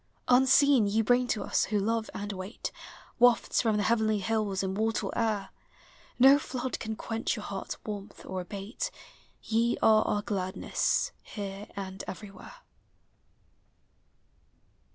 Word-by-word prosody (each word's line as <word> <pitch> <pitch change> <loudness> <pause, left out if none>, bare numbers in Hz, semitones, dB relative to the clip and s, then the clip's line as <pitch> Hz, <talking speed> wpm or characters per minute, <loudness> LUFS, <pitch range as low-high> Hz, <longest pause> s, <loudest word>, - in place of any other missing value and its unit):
Unseen, 265 -1 +5
ye 220 +2 +2
bring 245 +2 +3
to 220 - -1
us, - - +1
who 210 - -1
love 225 +2 0
and 205 0 -4
wait, 190 +3 -6 0.5
Wafts 245 -1 +4
from 220 -3 +1
the 205 - +1
heavenly 220 -1 +2
hills, 205 -2 -1
immortal 215 +4 -1
air; 215 -4 0 0.7
No 270 +3 +7
Hood 260 -2 -4
can 220 0 -4
quench 225 +1 -2
your 210 - -6
hearts' 195 -1 -5
warmth, 205 -2 -7
or 185 -1 -4
abate; 200 +5 -5 0.5
Ye 230 +2 +1
are 215 -1 +6
our 205 0 0
gladness, 190 -4 -1
here 200 -1 -7
and 195 -1 -6
everywhere. 195 - -9
215 Hz, 130 wpm, -29 LUFS, 200-230 Hz, 0.7 s, No